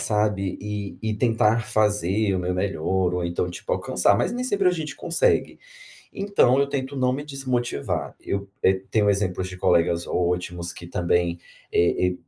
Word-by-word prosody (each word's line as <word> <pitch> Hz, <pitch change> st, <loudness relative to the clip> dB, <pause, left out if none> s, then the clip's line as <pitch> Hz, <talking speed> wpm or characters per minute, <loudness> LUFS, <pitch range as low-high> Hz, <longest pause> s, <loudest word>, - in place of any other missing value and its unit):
sabe, 105 Hz, -3 st, 0 dB
e 105 Hz, -1 st, -5 dB
e 110 Hz, -1 st, -1 dB
tentar 115 Hz, -1 st, +2 dB
fazer 105 Hz, -2 st, +1 dB
o -, -, 0 dB
meu 90 Hz, 0 st, -1 dB
melhor 90 Hz, -1 st, 0 dB
ou 90 Hz, -1 st, -1 dB
então, 85 Hz, +1 st, -1 dB
tipo, 90 Hz, -, -5 dB
alcançar, -, -, +2 dB
mas -, -, 0 dB
nem 250 Hz, +1 st, -2 dB
sempre 200 Hz, -6 st, +1 dB
a 180 Hz, -, +5 dB
gente 155 Hz, -5 st, -4 dB
consegue, 170 Hz, 0 st, +1 dB, 0.6 s
então 195 Hz, -10 st, +3 dB
eu 140 Hz, -, +1 dB
tento 135 Hz, 0 st, -3 dB
não 130 Hz, -2 st, +1 dB
me 145 Hz, +2 st, -4 dB
desmotivar. 130 Hz, -, -2 dB
Eu, 100 Hz, 0 st, -3 dB
eh, 95 Hz, 0 st, +3 dB
tenho 105 Hz, -2 st, +3 dB
exemplos 95 Hz, -2 st, -1 dB
de 95 Hz, -, -8 dB
colegas 85 Hz, -1 st, +2 dB
ótimos, 90 Hz, -1 st, -1 dB
que 85 Hz, -, -10 dB
também, 85 Hz, 0 st, 0 dB, 0.3 s
eh 85 Hz, +1 st, +3 dB
eh, -, -, -6 dB
100 Hz, 170 wpm, -24 LUFS, 90-125 Hz, 0.6 s, a